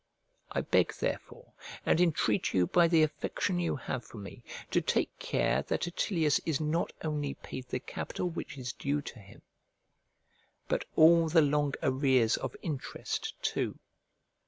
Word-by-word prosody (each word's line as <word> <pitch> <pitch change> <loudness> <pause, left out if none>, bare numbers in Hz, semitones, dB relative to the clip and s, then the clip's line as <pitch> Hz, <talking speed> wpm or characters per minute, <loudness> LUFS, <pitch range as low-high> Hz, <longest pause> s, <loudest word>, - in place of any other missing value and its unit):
I - - -1
beg - - +2
therefore, 485 - -4 0.3
and 170 - +3
entreat 150 - +2
you 90 -1 +4
by 170 - +4
the 165 -2 +5
affection 175 +4 -1
you 175 - 0
have 130 -3 -4
for 115 - -12
me, 100 -2 -9 0.3
to - - +3
take - - 0
care - - +1
that - - 0
Attilius 170 -3 +1
is 160 -4 0
not 155 +2 0
only 150 -3 -2
paid 130 -1 -8
the 125 - -2
capital 180 - -4
which 160 -4 -6
is 125 -2 -4
due 145 +1 -1
to 125 - -8
him, 100 -1 -16 1.2
but - - 0
all 165 +1 +6
the 160 -1 +5
long 145 -1 +1
arrears 130 -4 +3
of - - -5
interest 150 -6 -4
too. - - -1
150 Hz, 155 wpm, -31 LUFS, 130-165 Hz, 1.2 s, all